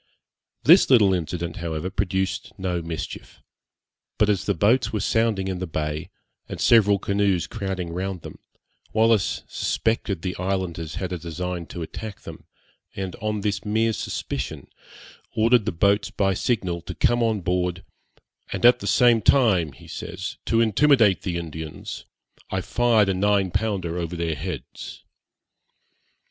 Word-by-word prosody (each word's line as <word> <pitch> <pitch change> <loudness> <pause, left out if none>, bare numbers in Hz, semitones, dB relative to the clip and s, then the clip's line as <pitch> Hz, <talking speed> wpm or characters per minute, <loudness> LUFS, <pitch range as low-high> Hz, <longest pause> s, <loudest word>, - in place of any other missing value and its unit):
This - - +7
little 105 -7 +6
incident, 85 -1 -3
however, 85 +1 -3
produced 95 0 -2
no 90 -3 -2
mischief; 80 -2 -7 0.8
but 105 - +3
as 100 -3 +1
the 100 - +1
boats 115 +9 +3
were 110 - -1
sounding 110 -3 +1
in 95 -1 -3
the 95 - -3
bay, 75 -1 -3 0.4
and - - -6
several 105 -3 +5
canoes 100 -3 +1
crowding 95 -5 -4
round 95 -1 -4
them, - - -10 0.5
Wallis 110 -3 +2
suspected 110 -6 -1
the 90 -1 -2
islanders 90 -4 -3
had 95 -1 -3
a 90 - -3
design 85 +1 -4
to 85 - -6
attack 105 +5 -7
them, - - -10 0.5
and, 95 -2 -4
on 105 -1 -2
this 100 0 -1
mere 110 +2 +1
suspicion, - - -4 0.7
ordered 115 0 +4
the - - 0
boats 100 +4 +2
by 95 -1 +1
signal 95 -4 -1
to 90 +2 -8
come 120 +9 +2
on 110 -3 +1
board, 90 +1 -1 0.7
'and - - -1
at 120 - +7
the 100 - -5
same 115 +2 +5
time,' 95 - +3
he - - -15
says, 90 +3 -6
'to 115 0 +2
intimidate 115 - +4
the 90 -3 -2
Indians, 80 -2 -7 0.4
I 95 - -1
fired 115 0 +3
a - - +2
nine 100 0 +2
pounder 95 -5 -1
over 85 0 -4
their 85 -1 -1
heads.' 85 +5 -7
95 Hz, 150 wpm, -24 LUFS, 85-105 Hz, 0.8 s, This